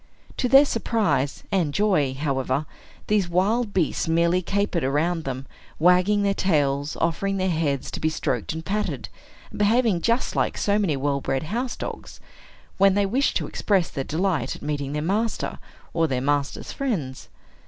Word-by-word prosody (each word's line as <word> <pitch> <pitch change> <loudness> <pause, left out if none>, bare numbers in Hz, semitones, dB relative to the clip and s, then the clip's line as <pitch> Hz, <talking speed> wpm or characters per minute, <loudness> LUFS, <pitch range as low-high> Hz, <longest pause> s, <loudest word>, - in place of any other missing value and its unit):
To 250 - 0
their 275 +3 +8
surprise 195 - 0
and 170 -7 0
joy, 180 -11 +2
however, 135 0 -1 0.4
these 205 -4 +1
wild 205 +6 +1
beasts 180 -5 0
merely 170 +2 +2
capered 200 -1 -1
around 160 +5 0
them, 135 0 -4 0.3
wagging 180 +5 +4
their 200 0 +2
tails, 145 -6 0
offering 195 +4 0
their 185 -1 0
heads 150 -4 -1
to - - -5
be 155 - +1
stroked 155 - -2
and 160 +1 -6
patted, 210 +2 -2 0.4
and - - -8
behaving 215 -3 +3
just 235 +5 0
like - - 0
so 205 -1 +1
many 170 -9 +1
well 140 0 -1
bred 135 +1 -1
house 235 +10 -3
dogs, - - -7 0.6
when 195 0 +5
they 205 0 +3
wish 255 +8 +1
to - - 0
express 195 -5 0
their 135 - -3
delight 170 +2 -1
at - - -12
meeting 145 -2 -3
their 150 0 -2
master, 210 +6 -1 0.3
or 165 -1 +2
their 130 -4 -1
master's 145 +1 -1
friends. 170 - -3
175 Hz, 165 wpm, -24 LUFS, 145-205 Hz, 0.6 s, their